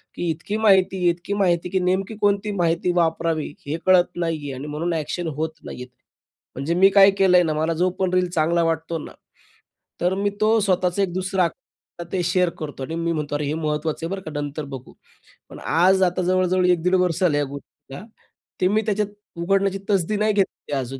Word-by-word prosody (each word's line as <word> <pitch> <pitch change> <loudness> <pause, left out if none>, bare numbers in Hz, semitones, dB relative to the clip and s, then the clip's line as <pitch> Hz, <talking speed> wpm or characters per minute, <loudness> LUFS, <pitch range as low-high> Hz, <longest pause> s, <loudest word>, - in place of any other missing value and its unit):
की 175 - -2
इतकी 165 +6 -3
माहिती, 190 -4 +3
इतकी 175 +3 -3
माहिती 180 -4 +1
की 190 - 0
नेमकी 190 +4 -1
कोणती 205 +1 +1
माहिती 175 -2 0
वापरावी 165 -3 0
हे 150 +3 -2
कळत 185 -1 +6
नाहीये 160 -5 -3
आणि 135 +3 -7
म्हणून 160 +4 -2
ॲक्शन 160 +2 -3
होत 160 +1 -2
नाही - - -8
आहेत. 125 - -13 0.7
म्हणजे 140 +6 -2
मी 190 +2 +6
काय 200 0 +7
केलं 185 -2 +5
आहे 180 - +5
ना, 155 - 0
मला 160 +2 0
जो 185 - +3
पण 185 -1 0
रील 180 0 +2
चांगला 170 0 +1
वाटतो 165 0 -1
ना, - - -9 0.9
तर 180 +2 +2
मी 200 +1 0
तो 220 +1 +4
स्वतःचं 185 -2 +1
एक 180 -3 -2
दुसरा 185 0 0
अक 175 -3 -10
ते 185 - 0
शेअर 180 0 +2
करतो 145 -3 -6
आणि 160 +5 -5
मी 170 0 -1
म्हणतो 150 -2 -3
"अरे 145 0 -1
हे 145 - -1
महत्त्वाचं 155 0 -2
आहे - - -4
बरं 195 0 -4
का, 155 - -8
नंतर 145 +1 -4
बघू". 130 -1 -9 0.6
पण - - -10
आज, 185 +3 +3
आता 180 0 +1
जवळ-जवळ 185 0 +2
1-1.5 180 +1 +2
वर्षं 180 -1 +1
झालं 150 -4 +2
आहे 145 - +1
या 140 - -6
गोष्टीला. 140 +2 -11 0.6
ते 185 - +4
मी 210 +3 +2
त्याच्यात 210 -1 0 0.3
उघडण्याची 195 +3 +1
तसदी 200 0 +1
नाही 215 +1 +2
घेतली 195 -6 -2
अजून 135 0 -4
175 Hz, 205 wpm, -22 LUFS, 160-190 Hz, 0.9 s, काय